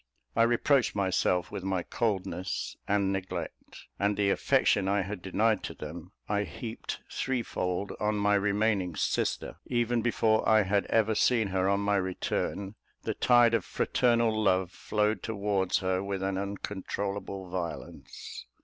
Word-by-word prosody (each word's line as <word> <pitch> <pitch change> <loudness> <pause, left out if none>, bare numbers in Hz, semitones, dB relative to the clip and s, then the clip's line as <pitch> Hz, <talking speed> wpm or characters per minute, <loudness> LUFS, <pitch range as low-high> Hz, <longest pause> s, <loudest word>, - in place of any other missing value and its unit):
I 115 - +3
reproached 120 +2 +3
myself 95 -3 +1
with 95 - -5
my 95 -2 -1
coldness 95 -5 -2
and 100 -1 +2
neglect; 95 -1 -6
and 100 0 +1
the 100 -1 +3
affection 95 0 +2
I 100 0 +2
had 100 -1 -6
denied 105 +4 +1
to - - -6
them, 85 +4 -8 0.2
I 105 -1 +1
heaped 115 +2 -6
threefold 100 -7 -2
on 105 0 +1
my 105 0 +2
remaining 100 -3 +1
sister: - - -1
even 120 0 +1
before 110 -2 +2
I 110 -1 +6
had 100 0 +1
ever 110 -1 +2
seen 110 -1 +2
her 95 0 +1
on 100 0 +2
my 100 0 +2
return, 95 +1 -2 0.3
the - - -1
tide 120 -2 +5
of 115 -5 +2
fraternal 115 0 +2
love 95 -3 +2
flowed 105 -1 0
towards 100 -4 0
her 95 0 +1
with 100 -1 -3
an 95 0 0
uncontrollable 100 0 -4
violence. 90 -2 -6
100 Hz, 145 wpm, -29 LUFS, 95-110 Hz, 0.3 s, I